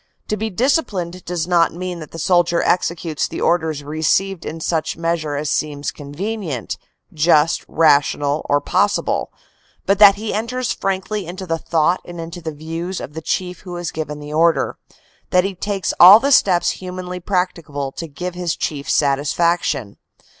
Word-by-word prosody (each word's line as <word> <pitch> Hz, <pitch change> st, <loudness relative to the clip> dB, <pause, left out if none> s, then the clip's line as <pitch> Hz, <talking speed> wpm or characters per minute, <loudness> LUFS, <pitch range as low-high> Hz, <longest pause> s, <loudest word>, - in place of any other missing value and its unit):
To 215 Hz, -, +1 dB
be 220 Hz, +2 st, -3 dB
disciplined 190 Hz, -, -1 dB
does 175 Hz, -1 st, -2 dB
not 170 Hz, -2 st, +3 dB
mean 180 Hz, 0 st, -5 dB
that 155 Hz, -, -9 dB
the -, -, -10 dB
soldier 175 Hz, +1 st, +2 dB
executes 170 Hz, -3 st, 0 dB
the -, -, -6 dB
orders 160 Hz, -4 st, 0 dB
received 160 Hz, +5 st, 0 dB
in 165 Hz, -, -5 dB
such 160 Hz, -1 st, -1 dB
mea 165 Hz, 0 st, +1 dB
sure 155 Hz, -3 st, -4 dB
as 145 Hz, 0 st, -2 dB
seems 145 Hz, -1 st, -2 dB
convenient, 150 Hz, -, -5 dB, 0.4 s
just, 155 Hz, 0 st, +3 dB
rational 145 Hz, -1 st, +2 dB
or 145 Hz, -, +4 dB
possible; 205 Hz, +7 st, 0 dB, 0.5 s
but 195 Hz, 0 st, +2 dB
that 200 Hz, -2 st, +9 dB
he 215 Hz, +1 st, -4 dB
enters 235 Hz, +4 st, -2 dB
frankly 195 Hz, 0 st, -2 dB
into 185 Hz, +2 st, -6 dB
the 165 Hz, -2 st, -2 dB
thought 165 Hz, +2 st, +1 dB
and 175 Hz, -1 st, -9 dB
into 165 Hz, +2 st, -7 dB
the 160 Hz, -1 st, -4 dB
views 165 Hz, +4 st, -5 dB
of 145 Hz, -, -8 dB
the 160 Hz, -, -6 dB
Chief 180 Hz, +2 st, -2 dB
who 180 Hz, -2 st, -8 dB
has 175 Hz, -2 st, -4 dB
given 150 Hz, -1 st, -5 dB
the 150 Hz, 0 st, -8 dB
order, 165 Hz, +1 st, +2 dB, 0.5 s
that 180 Hz, -1 st, +4 dB
he 195 Hz, +1 st, -2 dB
takes 195 Hz, 0 st, -2 dB
all 190 Hz, +5 st, +11 dB
the 280 Hz, +4 st, 0 dB
steps 185 Hz, -9 st, +4 dB
humanly 180 Hz, 0 st, -6 dB
practicable 170 Hz, -7 st, -2 dB
to 165 Hz, +4 st, -6 dB
give 175 Hz, +5 st, -5 dB
his 175 Hz, -2 st, -2 dB
Chief 145 Hz, -2 st, -4 dB
satisfaction. 145 Hz, -4 st, +1 dB
170 Hz, 170 wpm, -20 LUFS, 155-185 Hz, 0.5 s, all